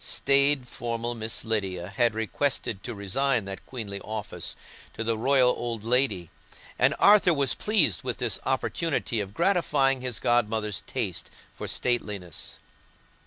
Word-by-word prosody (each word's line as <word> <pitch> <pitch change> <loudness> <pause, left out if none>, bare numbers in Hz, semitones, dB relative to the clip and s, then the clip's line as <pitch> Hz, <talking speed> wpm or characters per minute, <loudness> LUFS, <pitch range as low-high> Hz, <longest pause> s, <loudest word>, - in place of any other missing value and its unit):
Staid, 140 -1 +3
formal 120 0 -3
Miss 115 0 -3
Lydia 95 -5 -2
had 115 +2 +1
requested 110 -2 -1
to 120 - -5
resign 110 +4 0
that 95 0 -7
queenly 105 -6 -6
office 110 -1 -4 0.4
to 110 - -3
the 115 0 0
royal 130 +2 +5
old 115 -4 -4
lady, 115 - 0 0.5
and - - +4
Arthur 200 -4 +6
was 140 -2 +2
pleased 180 - +2
with - - -4
this - - 0
opportunity 140 -8 -1
of 100 0 -5
gratifying 145 -7 +2
his 125 -3 -3
godmother's 110 -4 +1
taste - - -3 0.2
for - - -7
stateliness. 105 -8 -2
120 Hz, 135 wpm, -27 LUFS, 105-135 Hz, 0.5 s, Arthur